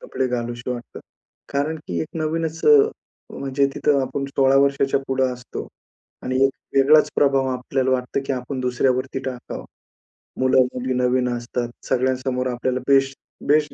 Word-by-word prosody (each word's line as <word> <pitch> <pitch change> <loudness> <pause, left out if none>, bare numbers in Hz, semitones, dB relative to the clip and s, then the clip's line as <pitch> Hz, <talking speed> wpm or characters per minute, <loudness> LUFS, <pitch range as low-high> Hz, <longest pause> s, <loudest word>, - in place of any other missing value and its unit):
कपडे 130 - -2
घालावेसे 120 0 -3
वाटते. 120 -1 -6 0.5
कारण 145 +3 0
की 85 -2 -2
एक 80 - -3
नवीनच 160 0 -2
अ, 445 - +9 0.6
म्हणजे 140 0 +1
तिथं 145 -2 +2
आपण 135 +2 -3
16 135 0 +4
वर्षाच्या 140 0 +2
पुढे 130 0 +1
असतो 125 0 -7 0.6
आणि 130 0 -2
एक 135 - +4 0.3
वेगळाच 150 +2 +5
प्रभाव 135 -2 +3
आपल्याला 130 +1 -1
वाटतं, 130 +1 0
की - - 0
आपण 130 +1 -4
दुसऱ्यावरती 130 +1 0
टाकावा. 125 -2 -6 0.8
मुलं-मुली 130 0 +2
नवीन 125 0 +1
असतात, 120 0 -3 0.2
सगळ्यांसमोर 130 0 0
आपल्याला 125 +1 -1
बेस्ट 135 -1 +3 0.3
बेस्ट 150 +1 +3
130 Hz, 140 wpm, -22 LUFS, 125-140 Hz, 0.8 s, अ